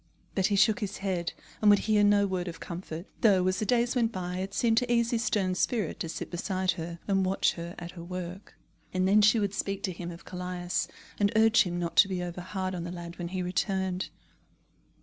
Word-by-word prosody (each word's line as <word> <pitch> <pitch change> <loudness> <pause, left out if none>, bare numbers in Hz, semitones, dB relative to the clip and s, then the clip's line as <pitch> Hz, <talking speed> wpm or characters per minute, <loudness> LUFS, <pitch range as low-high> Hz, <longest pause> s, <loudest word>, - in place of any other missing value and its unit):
But 190 -1 +2
he 205 - +1
shook 210 +2 +4
his 205 -3 -3
head, 185 -4 -2 0.3
and 210 - +6
would 205 - +8
hear 210 -1 +4
no 205 0 +5
word 185 -2 -2
of 170 - -6
comfort, 170 -1 -6 0.2
though, 195 -5 +5
as 185 0 +1
the 215 - -1
days 245 +2 +2
went 235 -2 +2
by, 180 -3 -4
it 190 +1 -3
seemed 225 +2 +2
to 245 -1 -2
ease 235 -1 +2
his 230 -1 +1
stern 195 -4 +1
spirit 205 -1 -1
to 165 - -3
sit - - -5
beside 185 +1 0
her, 170 +1 -5
and 195 -1 +2
watch 190 +1 +2
her 170 0 -7
at 175 0 -7
her 175 -2 -9
work. 180 +2 -7 0.4
And 185 0 +2
then 205 +2 +6
she 215 +3 +5
would 205 -2 0
speak 195 -1 -2
to 190 - 0
him 175 0 -6
of 170 -1 -10
Callias, 180 -1 -3 0.3
and 205 0 +3
urge 225 +1 +6
him 175 -3 -1
not 170 -1 -3
to 205 - +8
be 185 -2 -2
over 175 0 -5
hard 185 0 -3
on 175 -2 -4
the 175 - -5
lad 175 -1 -8
when 175 - -3
he 185 +1 -3
returned. 190 0 -1
185 Hz, 230 wpm, -29 LUFS, 175-205 Hz, 0.4 s, would